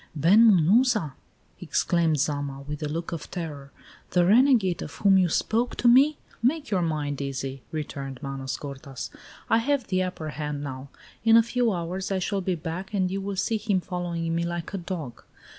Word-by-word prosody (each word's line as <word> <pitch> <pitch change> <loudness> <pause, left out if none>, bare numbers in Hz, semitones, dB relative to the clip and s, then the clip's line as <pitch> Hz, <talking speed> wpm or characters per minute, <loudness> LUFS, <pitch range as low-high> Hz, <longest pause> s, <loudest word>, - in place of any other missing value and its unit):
"Ben 200 +10 +6
Munuza!" 200 - +3 0.5
exclaimed 165 -3 +1
Zama, 145 -1 -2
with 150 +1 -6
a 150 - -2
look 165 +2 -4
of 165 -3 -6
terror; 150 -6 -6 0.4
"the 175 -1 +3
renegade 220 - +4
of 145 - -7
whom 200 -2 +4
you 180 -2 +3
spoke 230 +8 0
to 245 - +1
me?" 275 +5 +6 0.2
"Make 285 +4 0
your 190 -3 +2
mind 150 -4 -2
easy," 135 -1 -4
returned 140 -3 -5
Manos 135 -1 -4
gordas. 140 -2 -7 0.4
"I 225 - +4
have 275 +1 0
the 185 -1 +1
upper 180 -4 -4
hand 150 -1 -4
now. 135 -1 -7 0.3
In 225 0 +7
a 230 - +6
few 235 0 +1
hours 180 +2 -3
I 195 - +1
shall 195 +1 -1
be 185 0 -1
back 175 +5 -5
and 185 -2 +1
you 195 +1 -2
will 200 0 -4
see 220 +4 0
him 205 -3 0
following 170 -2 -3
me 170 +1 0
like 170 +2 -4
a 195 - -2
dog. 170 -9 -6
175 Hz, 185 wpm, -26 LUFS, 150-200 Hz, 0.5 s, In